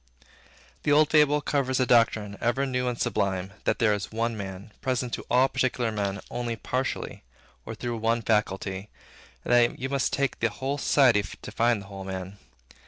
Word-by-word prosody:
The 150 Hz, -, 0 dB
old 150 Hz, +1 st, +5 dB
fable 150 Hz, -1 st, +4 dB
covers 135 Hz, -3 st, 0 dB
a 130 Hz, -, +3 dB
doctrine 110 Hz, -4 st, +3 dB
ever 120 Hz, +4 st, +1 dB
new 125 Hz, -1 st, -1 dB
and 120 Hz, -1 st, -2 dB
sublime; 100 Hz, -4 st, -1 dB
that -, -, +2 dB
there 110 Hz, -3 st, +3 dB
is 105 Hz, -2 st, -4 dB
One 115 Hz, +1 st, -1 dB
Man, 95 Hz, 0 st, -7 dB
present 125 Hz, -2 st, -1 dB
to -, -, -4 dB
all 125 Hz, +2 st, +5 dB
particular 130 Hz, -3 st, 0 dB
men 100 Hz, -2 st, -2 dB
only 120 Hz, -1 st, -2 dB
partially, 130 Hz, +4 st, -3 dB, 0.5 s
or -, -, -5 dB
through 120 Hz, -1 st, -4 dB
one 115 Hz, +1 st, +1 dB
faculty; 100 Hz, -2 st, -1 dB, 0.6 s
and -, -, +1 dB
that 120 Hz, -1 st, +4 dB
you 130 Hz, +2 st, -4 dB
must 140 Hz, -1 st, 0 dB
take 140 Hz, -1 st, -1 dB
the 115 Hz, -, +2 dB
whole 135 Hz, +6 st, -3 dB
society 125 Hz, -7 st, +4 dB, 0.2 s
to -, -, -9 dB
find 115 Hz, -2 st, +1 dB
the -, -, -14 dB
whole 95 Hz, -1 st, -8 dB
man. 95 Hz, +1 st, -6 dB
115 Hz, 180 wpm, -27 LUFS, 105-130 Hz, 0.6 s, old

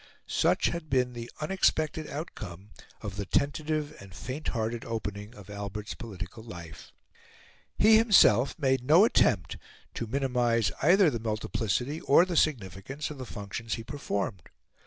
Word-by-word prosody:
Such 175 Hz, +3 st, +2 dB
had 170 Hz, -3 st, -5 dB
been 125 Hz, -2 st, +1 dB
the 120 Hz, 0 st, -7 dB
unexpected 155 Hz, -2 st, 0 dB
outcome 105 Hz, -, -7 dB, 0.3 s
of 100 Hz, -2 st, -6 dB
the 100 Hz, -, -3 dB
tentative 150 Hz, +2 st, -1 dB
and 95 Hz, -3 st, -12 dB
fainthearted 120 Hz, -4 st, -3 dB
opening 105 Hz, -1 st, -5 dB
of 100 Hz, -2 st, -13 dB
Albert's 100 Hz, 0 st, -6 dB
political 95 Hz, -1 st, -8 dB
life. 85 Hz, -8 st, -10 dB, 0.9 s
He 220 Hz, +1 st, +7 dB
himself 175 Hz, -, +5 dB
made 135 Hz, -4 st, +1 dB
no 160 Hz, -, +6 dB
attempt 85 Hz, -, +2 dB, 0.4 s
to 115 Hz, -, -4 dB
minimise 120 Hz, -5 st, +1 dB
either 175 Hz, +2 st, +5 dB
the 115 Hz, -, -3 dB
multiplicity 110 Hz, +5 st, -2 dB
or 155 Hz, +5 st, +5 dB
the 180 Hz, -2 st, -4 dB
significance 135 Hz, -, -1 dB
of 145 Hz, -, -9 dB
the 130 Hz, -, -6 dB
functions 105 Hz, +3 st, -5 dB
he 115 Hz, -, -7 dB
performed. 100 Hz, -, -4 dB
120 Hz, 135 wpm, -29 LUFS, 105-150 Hz, 0.9 s, He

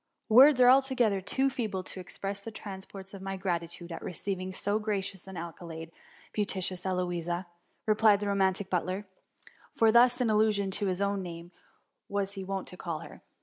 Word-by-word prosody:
' -, -, -55 dB
Words 260 Hz, +4 st, +8 dB
are 250 Hz, -, +7 dB
altogether 250 Hz, -6 st, +4 dB
too 265 Hz, +8 st, +1 dB
feeble 210 Hz, -7 st, -3 dB
to 185 Hz, -, -9 dB
express 195 Hz, +2 st, -5 dB
the 200 Hz, -, -7 dB
transports 195 Hz, -2 st, -9 dB
of 195 Hz, -, -8 dB
my 195 Hz, 0 st, -4 dB
gratitude 175 Hz, -2 st, -3 dB
at 165 Hz, -, -6 dB
receiving 185 Hz, +1 st, -3 dB
so 205 Hz, +3 st, 0 dB
gracious 195 Hz, -3 st, -3 dB
an 190 Hz, -1 st, -8 dB
accolade, 165 Hz, -1 st, -7 dB, 0.4 s
beauteous 190 Hz, -3 st, -1 dB
Eloisa,'* 175 Hz, -1 st, -1 dB, 0.4 s
replied 215 Hz, -1 st, +5 dB
the 205 Hz, -, -3 dB
romantic 195 Hz, -1 st, +1 dB
butler; 185 Hz, +2 st, -1 dB, 0.7 s
for 225 Hz, -1 st, +5 dB
thus, 245 Hz, +2 st, +5 dB
in 240 Hz, -3 st, +2 dB
allusion 210 Hz, -2 st, +2 dB
to 200 Hz, +1 st, +1 dB
his 185 Hz, +1 st, -1 dB
own 200 Hz, 0 st, +1 dB
name, 170 Hz, -1 st, -8 dB, 0.6 s
was 200 Hz, -1 st, -1 dB
he 195 Hz, -1 st, -6 dB
wont 195 Hz, 0 st, -3 dB
to 180 Hz, -, -11 dB
call 165 Hz, -4 st, -4 dB
her. -, -, -11 dB
195 Hz, 175 wpm, -30 LUFS, 180-210 Hz, 0.7 s, Words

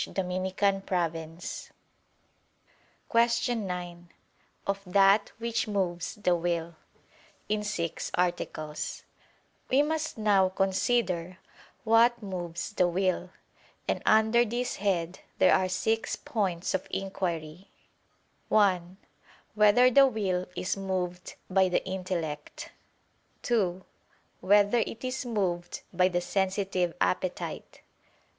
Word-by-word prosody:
________________________ 180 Hz, -3 st, -2 dB, 1.4 s
QUESTION 235 Hz, -2 st, +2 dB
9 175 Hz, -1 st, -6 dB, 0.6 s
OF 200 Hz, 0 st, -1 dB
THAT 195 Hz, +2 st, +4 dB
WHICH 230 Hz, 0 st, -1 dB
MOVES 185 Hz, -4 st, -2 dB
THE 185 Hz, -4 st, +1 dB
WILL 170 Hz, -1 st, -2 dB, 0.7 s
(In 210 Hz, 0 st, 0 dB
Six 170 Hz, -6 st, -3 dB
Articles) 165 Hz, -4 st, -2 dB, 0.7 s
We 270 Hz, +3 st, +4 dB
must 315 Hz, -1 st, -2 dB
now 200 Hz, -3 st, +3 dB
consider 190 Hz, -2 st, 0 dB, 0.5 s
what 230 Hz, +1 st, +4 dB
moves 175 Hz, -1 st, -5 dB
the 180 Hz, -3 st, +3 dB
will: 185 Hz, 0 st, 0 dB, 0.6 s
and -, -, 0 dB
under 220 Hz, +2 st, +4 dB
this 240 Hz, +2 st, -2 dB
head 185 Hz, -3 st, -1 dB, 0.2 s
there 185 Hz, -, +5 dB
are 185 Hz, 0 st, +2 dB
six 220 Hz, +5 st, 0 dB
points 190 Hz, -6 st, -2 dB
of 190 Hz, -, -2 dB
inquiry: 180 Hz, -3 st, -4 dB, 0.8 s
(1) 185 Hz, -3 st, +2 dB, 0.6 s
Whether 215 Hz, +4 st, +5 dB
the 275 Hz, +2 st, +7 dB
will 190 Hz, -7 st, -1 dB
is 185 Hz, -, -1 dB
moved 185 Hz, -2 st, -3 dB
by 190 Hz, 0 st, +3 dB
the 180 Hz, -, 0 dB
intellect? 180 Hz, -5 st, -4 dB, 0.7 s
(2) 190 Hz, -6 st, 0 dB, 0.5 s
Whether 205 Hz, +4 st, +4 dB
it 225 Hz, -, -3 dB
is 255 Hz, 0 st, -3 dB
moved 180 Hz, -6 st, -2 dB
by 180 Hz, +1 st, +4 dB
the 175 Hz, -1 st, 0 dB
sensitive 190 Hz, -2 st, -1 dB
appetite? 90 Hz, 0 st, -2 dB
190 Hz, 100 wpm, -28 LUFS, 175-210 Hz, 1.4 s, the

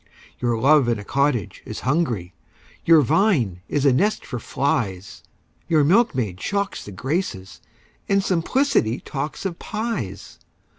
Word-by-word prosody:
Your 120 Hz, -2 st, 0 dB
love 140 Hz, +2 st, +4 dB
in 115 Hz, -, +1 dB
a 105 Hz, -, -7 dB
cottage 140 Hz, -3 st, 0 dB
is -, -, -7 dB
hungry, 125 Hz, -, -1 dB, 0.5 s
Your 165 Hz, -2 st, +7 dB
vine 125 Hz, -, +2 dB
is 145 Hz, -1 st, 0 dB
a 135 Hz, -, +5 dB
nest 205 Hz, +11 st, +1 dB
for 125 Hz, -, -5 dB
flies 100 Hz, -7 st, -2 dB, 0.5 s
Your 160 Hz, -3 st, +3 dB
milkmaid 140 Hz, -, +2 dB
shocks 200 Hz, 0 st, -2 dB
the 105 Hz, -, -9 dB
Graces, 100 Hz, -, -3 dB, 0.5 s
And 195 Hz, 0 st, +3 dB
simplicity 180 Hz, -, +1 dB
talks 145 Hz, +5 st, -5 dB
of 175 Hz, -3 st, -3 dB
pies! 215 Hz, -, -5 dB
140 Hz, 135 wpm, -22 LUFS, 110-185 Hz, 0.5 s, Your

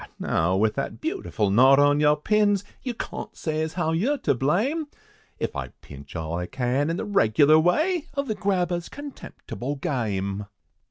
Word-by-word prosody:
now, 85 Hz, +3 st, +1 dB
with 110 Hz, +1 st, +2 dB
that 135 Hz, -, -4 dB
beautiful 315 Hz, -, -2 dB
knot 130 Hz, +6 st, +6 dB
on 145 Hz, +1 st, +4 dB
your 150 Hz, 0 st, +4 dB
pins, 205 Hz, +4 st, +2 dB, 0.2 s
You 250 Hz, -3 st, -4 dB
cawn't -, -, -7 dB
say 155 Hz, -1 st, -2 dB
as 160 Hz, 0 st, -3 dB
how 175 Hz, -3 st, 0 dB
yer 225 Hz, -, +1 dB
to -, -, +3 dB
blame, 215 Hz, -, 0 dB, 0.5 s
If -, -, -3 dB
I -, -, -3 dB, 0.2 s
pinch 70 Hz, +2 st, -12 dB
all 80 Hz, 0 st, -3 dB
I 90 Hz, -, -4 dB
can 130 Hz, -, 0 dB
in 165 Hz, -, -1 dB
the -, -, -3 dB
regular 155 Hz, -, +4 dB
way, 310 Hz, -, +1 dB
Of 280 Hz, 0 st, -1 dB
the 220 Hz, -, 0 dB
grabber's 180 Hz, -4 st, -1 dB
contemptible 265 Hz, -, -7 dB
game!" 105 Hz, -7 st, -2 dB
155 Hz, 170 wpm, -25 LUFS, -, 0.5 s, knot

